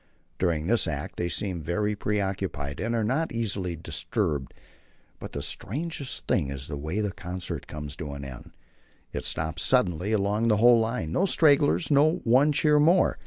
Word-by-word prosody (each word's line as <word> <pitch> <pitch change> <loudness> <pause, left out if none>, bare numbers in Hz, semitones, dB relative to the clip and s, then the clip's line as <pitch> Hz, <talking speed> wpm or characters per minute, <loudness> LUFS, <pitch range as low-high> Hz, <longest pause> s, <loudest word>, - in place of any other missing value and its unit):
During 85 -4 0
this 115 +1 +2
act 75 -3 -4
they 85 - -1
seem 90 -1 -2
very 105 +7 -1
preoccupied, 95 -9 -2
and 115 +1 -1
are 115 - +1
not 135 +9 0
easily 100 -6 -2
disturbed. 75 -3 -2 0.7
But - - -8
the 70 - -4
strangest 140 - -4
thing 70 - +1
is 70 0 -6
the 75 - -5
way 80 +9 -3
the 105 -2 -1
concert 90 0 -5
comes 75 -1 -6
to 75 -5 -5
an 70 -1 -7
end. 65 -2 -9 0.6
It - - -4
stops 80 +1 -1
suddenly 95 -3 +2
along 105 +2 +1
the 105 -2 +4
whole 120 +2 +6
line 110 -8 -1
no 190 - +2
stragglers, 150 -1 +3
no 145 +3 +5
"one 130 +6 +4
cheer 150 +1 +3
more." 170 +5 +4
100 Hz, 170 wpm, -27 LUFS, 80-120 Hz, 0.7 s, whole